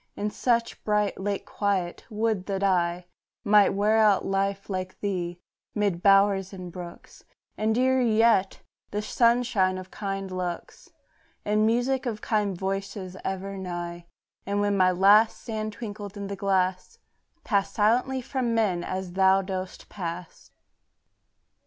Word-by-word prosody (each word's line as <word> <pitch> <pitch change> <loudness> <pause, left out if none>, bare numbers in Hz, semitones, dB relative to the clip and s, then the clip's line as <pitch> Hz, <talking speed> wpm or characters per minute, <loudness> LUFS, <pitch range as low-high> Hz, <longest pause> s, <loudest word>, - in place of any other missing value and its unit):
In 210 +1 -2
such 235 0 +1
a - - -25
bright, 210 -1 0
late 200 0 -2
quiet, 195 -4 -2
would 215 -3 -1
that 195 -1 -2
I 175 -2 +1 0.4
Might 205 -1 +5
wear 210 +2 +3
out 210 -3 +4
life 195 0 -1
like 185 -1 -4
thee, 175 -3 -3 0.4
mid 200 -5 0
bowers 195 -1 +4
and 180 -2 -8
brooks, 175 -1 -10 0.3
And, 220 +1 0
dearer 260 +1 +3
yet, 225 -4 +3 0.3
the 210 +1 -3
sunshine 230 -5 +2
of 185 0 -9
kind 195 -2 -4
looks, 180 -1 -5 0.6
And 215 +1 +2
music 255 +3 +1
of 220 -3 -3
kind 205 -5 -1
voices 195 0 -4
ever 195 +1 -4
nigh; 175 -2 -6 0.4
And 200 +1 -1
when 205 0 +1
my 185 -1 +4
last 200 +5 +5
sand 215 -2 -4
twinkled 205 -2 -7
in 200 - -5
the 200 0 -4
glass, 190 - -1 0.5
Pass 200 -3 0
silently 250 +5 +1
from 250 -3 -1
men, 190 -6 +1
as 185 -1 -4
thou 190 +1 +4
dost 185 -1 -6
pass. 175 -2 -7
200 Hz, 140 wpm, -26 LUFS, 185-215 Hz, 0.6 s, Might